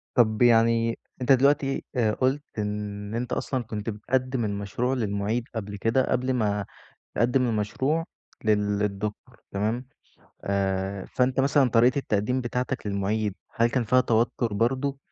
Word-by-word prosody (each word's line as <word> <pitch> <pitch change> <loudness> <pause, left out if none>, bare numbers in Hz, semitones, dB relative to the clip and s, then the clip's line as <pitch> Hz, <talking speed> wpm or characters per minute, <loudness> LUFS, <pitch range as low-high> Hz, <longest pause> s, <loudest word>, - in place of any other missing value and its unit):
طب 110 -3 +3
يعني 115 -1 +4 0.2
أنت 125 +2 +2
دلوقتي 135 +1 +3
آآ 115 -4 +2
قُلت 135 +5 0
إن 105 0 -4
أنت 120 +1 -2
أصلًا 130 -3 -2
كنت 110 -1 -5
بتقدِّم 125 +3 -1
المشروع 100 +5 -2
للمعيد 110 0 -1
قبل 105 -2 -4
كده، 115 +6 +1
قبل 130 +1 +1
ما 105 -4 0 0.5
تقدِّم 125 +3 +2
المشروع 130 +9 0 0.4
لل 105 -1 +2
الدكتور، 105 +1 -4
تمام. 110 +6 -1 0.6
آآ، 95 0 -1
فأنت 125 +1 0
مثلًا 140 -1 +4
طريقة 120 +4 +4
التقديم 120 +2 0
بتاعتك 125 -1 -3
للمعيد، 100 +1 -1 0.2
هل 115 +1 +4
كان 125 +1 0
فيها 125 +3 +4
توتر 115 -1 +1
برضه؟ 130 +6 0
115 Hz, 135 wpm, -26 LUFS, 105-130 Hz, 0.6 s, يعني